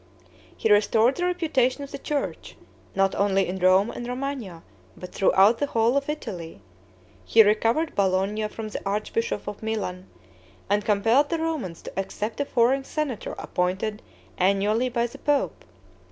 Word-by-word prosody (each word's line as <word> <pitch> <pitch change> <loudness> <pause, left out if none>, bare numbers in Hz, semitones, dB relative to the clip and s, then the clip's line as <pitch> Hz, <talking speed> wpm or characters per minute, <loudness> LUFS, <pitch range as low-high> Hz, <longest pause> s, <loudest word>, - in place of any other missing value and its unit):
He 220 - +1
restored 220 +4 +4
the 355 - -1
reputation 300 -7 +1
of 280 - -9
the - - -6
church, 290 0 -4 0.4
not 195 0 +2
only 195 -1 +2
in 190 +1 -4
Rome 185 +4 +4
and 240 - -6
Romagna, 250 -9 -5 0.3
but 180 - -9
throughout 195 +4 +4
the 285 - 0
whole 230 -1 +2
of 280 +1 0
Italy; 170 - -6 0.6
he 225 - +6
recovered 225 +9 +1
Bologna 200 +2 +1
from 215 0 -7
the - - -5
archbishop 215 - -2
of 205 0 -6
Milan, 195 -4 -3 0.6
and 205 0 +2
compelled 225 +8 +3
the 335 - 0
Romans 310 - -3
to - - -6
accept 210 +4 -4
a - - 0
foreign 260 +2 +2
senator 280 -5 -3
appointed 190 +4 -2 0.4
annually 200 +6 +2
by 235 -1 0
the 240 - -8
pope. 285 - 0
220 Hz, 155 wpm, -25 LUFS, 195-270 Hz, 0.6 s, he